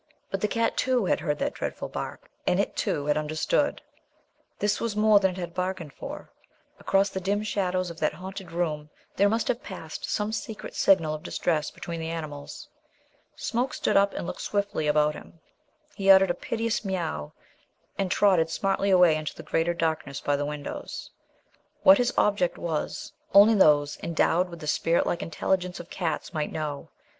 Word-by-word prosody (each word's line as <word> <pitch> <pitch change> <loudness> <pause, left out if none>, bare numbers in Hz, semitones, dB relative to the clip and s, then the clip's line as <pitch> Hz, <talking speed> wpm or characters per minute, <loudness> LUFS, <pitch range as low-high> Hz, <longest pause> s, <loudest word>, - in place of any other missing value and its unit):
But 195 - -2
the 210 - +2
cat, 230 +1 0
too, 255 -5 +2
had - - +2
heard 150 -1 -1
that - - -1
dreadful - - -4
bark; - - -7 0.2
and - - +3
it, - - 0
too, 145 - -1
had 150 0 +2
understood. 155 - 0 0.7
This 205 0 0
was 230 -3 -2
more 210 -1 +5
than 190 -1 +3
it 180 - -7
had 175 -2 -5
bargained 180 -4 -3
for. - - -8 0.5
Across 195 +1 +2
the 190 - -4
dim 200 +3 0
shadows 185 -4 -1
of 165 - -11
that 155 0 0
haunted 190 +2 -8
room 155 -3 -2 0.3
there 200 +1 +4
must 225 +2 0
have 240 - 0
passed - - -7
some 210 0 -1
secret 220 -1 -5
signal 165 -6 +3
of 155 - -5
distress 155 -2 -1
between 170 -1 -6
the 160 0 -4
animals. 155 - -6 0.7
Smoke 245 +3 -2
stood - - 0
up 200 0 +4
and - - -4
looked - - -5
swiftly 200 -6 -1
about 150 0 +3
him. 165 - -13 0.5
He 195 -1 -1
uttered 190 -1 +8
a - - 0
piteous 225 +5 -2
meow 170 - -3 0.6
and 195 -2 -1
trotted 185 -4 +3
smartly 195 +3 0
away 180 -4 +6
into 155 -1 -4
the 165 - -9
greater 165 +2 0
darkness 160 -4 -1
by 145 - 0
the 145 0 -2
windows. 150 -1 -6 0.7
What 285 -1 +8
his 245 -1 +2
object 200 -4 +2
was 160 -3 -3 0.2
only 205 +3 +9
those 150 -7 +4
endowed 170 +2 +1
with 170 -2 -10
the - - -6
spirit 165 +3 +2
like 175 - -1
intelligence 180 +2 -1
of 175 - -10
cats 175 0 -3
might 155 -2 -2
know. 150 -2 -4
180 Hz, 180 wpm, -27 LUFS, 155-200 Hz, 0.7 s, only